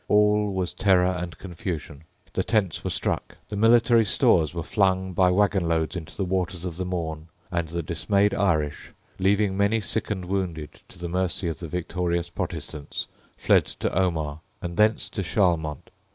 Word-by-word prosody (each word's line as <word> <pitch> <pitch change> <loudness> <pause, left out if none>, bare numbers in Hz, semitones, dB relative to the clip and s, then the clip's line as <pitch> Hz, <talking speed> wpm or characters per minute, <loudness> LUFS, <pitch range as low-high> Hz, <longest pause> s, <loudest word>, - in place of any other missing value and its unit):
All 105 0 +3
was 95 -2 -2
terror 95 -2 +4
and 90 -2 -6
confusion: 80 -5 -6 0.3
the - - 0
tents 100 -8 0
were - - -2
struck: - - -2
the - - -4
military 115 +2 +5
stores 85 -5 +3
were 85 -1 -4
flung 95 -1 +1
by 90 +1 +4
waggon 95 -1 +2
loads 80 0 0
into 85 -3 -7
the 95 - 0
waters 90 -1 -2
of 85 -2 -5
the 95 - -2
Mourne; 80 -3 -4 0.2
and 85 -1 -1
the 85 +1 -3
dismayed 95 +6 +1
Irish, 80 -7 0 0.3
leaving 100 +1 +2
many 100 +3 +2
sick 110 +1 -2
and 95 -4 -3
wounded 90 -5 -3
to - - -16
the 85 0 -5
mercy 90 +1 -1
of 80 - -5
the 85 - -6
victorious 85 +1 -2
Protestants, 75 -3 -4 0.3
fled - - +4
to - - -3
Omagh, 80 -5 0 0.2
and 85 -1 -5
thence 110 +4 +3
to 100 - -4
Charlemont. 85 -6 0
90 Hz, 170 wpm, -25 LUFS, 85-100 Hz, 0.3 s, military